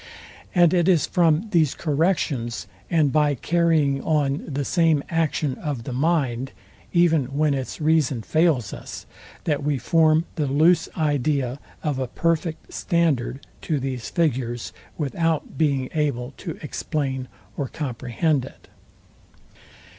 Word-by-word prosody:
And 175 -2 +5
it 175 -1 +3
is 170 -6 +4
from 170 +2 +2
these 160 -6 +3
corrections, 145 -7 0 0.2
and 155 -5 +3
by 150 -1 +3
carrying 155 -2 +2
on 145 -2 0
the 140 -1 -2
same 165 -4 +2
action 160 -4 0
of 145 -7 -3
the 125 - -5
mind, 135 -3 0 0.4
even 165 -5 +3
when 145 +3 +1
its 135 -2 -4
reason 150 -6 +2
fails 155 - +1
us, - - -8 0.4
that 150 -3 0
we 145 -1 +1
form 160 +4 +3
the 150 -2 0
loose 160 +5 +3
idea 145 -4 0 0.2
of 145 -4 -1
a 130 - -1
perfect 165 +3 -2
standard 145 -6 0 0.2
to 155 -3 -1
these 130 -3 -4
figures, 125 -8 -1 0.2
without 160 +1 -1
being 140 -4 +1
able 140 -5 -1
to 170 -5 -6
explain 135 -3 -3 0.3
or 140 - -2
comprehend 130 +2 -1
it. 135 - -13
150 Hz, 130 wpm, -23 LUFS, 135-165 Hz, 0.4 s, And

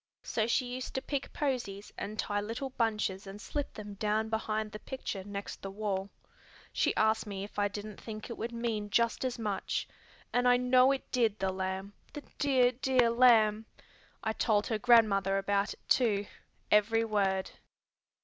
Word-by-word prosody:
So 220 -1 0
she 250 +2 +2
used 250 +1 -6
to 265 - 0
pick 280 -2 -3
posies 235 -8 -3
and 215 +1 -5
tie 205 -1 -1
little 230 +6 -4
bunches 210 -5 -1
and 195 +1 -8
slip 290 +6 -4
them 210 -1 -7
down 215 +2 0
behind 220 -1 -2
the 215 - -7
picture 225 -6 -5
next 200 0 -6
the 195 - -5
wall. 195 -1 -3 0.6
She - - +1
asked 220 0 +2
me 195 -1 -4
if 205 0 -7
I 205 - +3
didn't 205 0 -7
think 215 -1 -7
it 235 - -6
would 230 +1 -4
mean 230 -3 -2
just 235 +4 +1
as 255 -2 -2
much. 210 -4 -2 0.5
And 245 0 +3
I 245 0 +6
know 255 +1 +5
it 275 - -3
did, 230 -4 +2
the 190 -1 0
lamb, 190 +1 -4 0.2
the 295 - -7 0.2
dear, 260 -4 +4
dear 255 -1 +2
lamb! 225 -3 +5 0.6
I 220 - 0
told 215 -2 +2
her 220 -2 -1
grandmother 205 -5 +4
about 200 +1 0
it - - -34
too, 210 -6 +3 0.5
every 225 +2 +4
word. 195 -3 0
215 Hz, 175 wpm, -31 LUFS, 205-245 Hz, 0.6 s, I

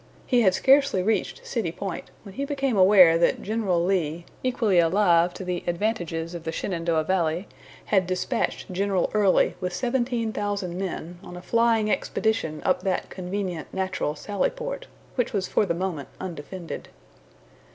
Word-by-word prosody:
He 245 -2 +3
had 190 -4 +4
scarcely 270 -8 +4
reached 225 - -1
City 480 - -2
Point - - -6
when 200 -3 -11
he 275 - -3
became 275 -3 -1
aware 185 -4 +7
that 170 - +2
General 195 -6 0
Lee, 170 -3 0 0.2
equally 225 -7 +2
alive 170 0 +4
to 190 - -6
the 180 -1 -2
advantages 175 -3 -2
of 170 -2 -6
the 160 - -3
Shenandoah 165 -2 -1
valley, 170 +1 0 0.4
had 190 -4 +2
dispatched 185 0 -2
General 195 -1 0
Early 205 -3 +3
with 180 -1 -2
seventeen 240 -3 -1
thousand 200 -4 -2
men 180 -2 -5
on 180 - -9
a - - -8
flying 230 -1 +2
expedition 220 -11 -1
up 270 0 +2
that 190 -3 -2
convenient 185 -3 -4
natural 185 -5 -2
sally 200 +5 -1
port, - - -6 0.3
which 245 -3 -1
was 195 -3 0
for 205 - +1
the 170 - 0
moment 170 -6 -3
undefended. 175 0 -7
190 Hz, 155 wpm, -25 LUFS, 175-220 Hz, 0.4 s, aware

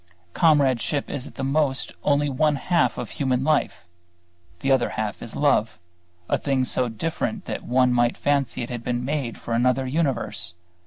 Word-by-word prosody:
Comradeship 145 -3 +2
is 140 0 -4
at - - -13
the 135 - -4
most 135 -1 0
only 145 0 +2
one 150 +2 +2
half 170 +5 +1
of - - -5
human 130 -2 0
life; 150 -9 0 0.8
the 135 - +1
other 130 -2 +3
half 110 -1 -3
is 115 - -8
Love, 115 - +2 0.5
a - - +1
thing 135 -2 +1
so 125 0 0
different 165 - -3
that - - -4
one 125 0 +3
might 120 0 +2
fancy 140 -4 0
it 120 - -6
had 120 -1 -5
been 120 0 -2
made 135 -4 -2
for 115 - -5
another 125 +3 +2
universe. 130 - -1
130 Hz, 170 wpm, -24 LUFS, 120-145 Hz, 0.8 s, other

